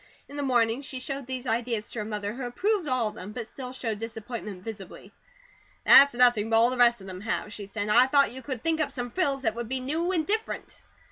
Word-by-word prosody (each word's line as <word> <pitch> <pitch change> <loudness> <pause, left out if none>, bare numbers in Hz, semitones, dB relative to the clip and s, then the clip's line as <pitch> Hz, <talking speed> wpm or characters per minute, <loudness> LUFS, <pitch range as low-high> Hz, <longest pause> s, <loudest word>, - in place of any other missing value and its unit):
In 285 - -11
the 290 - -3
morning, 240 -2 +1
she 265 -2 -6
showed 275 0 -5
these 260 -1 -5
ideas 230 -2 -2
to 230 - -5
her 210 - -3
mother 210 -1 -4
who 260 - -8
approved 360 - -1
all 255 -5 +1
of - - -12
them, 205 +3 -9
but 235 -1 -5
still 250 +2 -8
showed 230 -5 -3
disappointment 225 -3 -7
visibly. 200 -4 -9 0.7
"That's 280 -2 +8
nothing 240 -3 +4
but 225 - +4
all 235 +2 +5
the 255 - -3
rest 240 -3 +4
of - - -11
them 185 0 -8
have," 210 -1 -3
she 205 -2 -7
said. 205 0 -4
"I 240 +5 +5
thought 280 +1 +3
you 260 +2 -8
could 260 -4 -5
think 325 -1 +1
up 285 -2 -1
some 245 -3 -5
frills 275 -6 0
that 220 -3 +1
would 235 0 -6
be 260 0 -1
new, 315 +8 -1
and 330 -4 0
different." 435 +2 -1
245 Hz, 245 wpm, -27 LUFS, 220-270 Hz, 0.7 s, That's